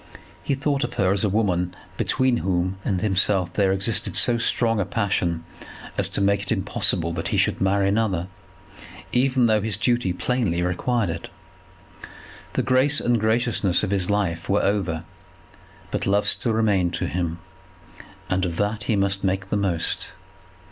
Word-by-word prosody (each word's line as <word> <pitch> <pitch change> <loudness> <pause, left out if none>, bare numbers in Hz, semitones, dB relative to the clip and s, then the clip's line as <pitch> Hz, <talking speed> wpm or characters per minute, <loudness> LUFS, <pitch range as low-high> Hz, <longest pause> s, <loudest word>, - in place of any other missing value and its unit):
He 140 - -1
thought 140 0 0
of 120 0 -4
her 95 -1 +2
as 100 -1 +3
a 105 - +2
woman 95 -4 0 0.2
between 130 +2 +1
whom 95 -1 -1
and 95 -3 0
himself 95 -3 +2
there 100 -2 +2
existed 95 +3 -1
so 120 -1 +3
strong 115 -1 +1
a - - +2
passion 95 -5 -1 0.5
as - - +1
to - - -1
make 100 0 +2
it 100 - -5
impossible 95 -5 0
that 80 0 -3
he - - -1
should - - +1
marry 95 0 +2
another, 100 -5 0 0.9
even 130 0 +2
though 110 -2 +3
his 105 -2 -1
duty 120 -4 +1
plainly 90 -3 -1
required 95 +3 0
it. 85 +1 -6 1.3
The - - 0
grace 135 +3 +3
and 120 -1 +1
graciousness 110 -4 +1
of 100 - -1
his 95 -2 0
life 100 -5 -1
were 100 +1 +2
over; 90 -5 -1 0.9
but - - -2
love 100 +1 +2
still 115 - +2
remained 100 -6 +1
to - - -2
him, 85 -2 -2 0.9
and 95 0 0
of 85 -3 -2
that 105 +1 -1
he 110 - +1
must 100 0 0
make 95 0 -1
the - - +1
most. 95 -6 -1
100 Hz, 165 wpm, -23 LUFS, 90-115 Hz, 1.3 s, as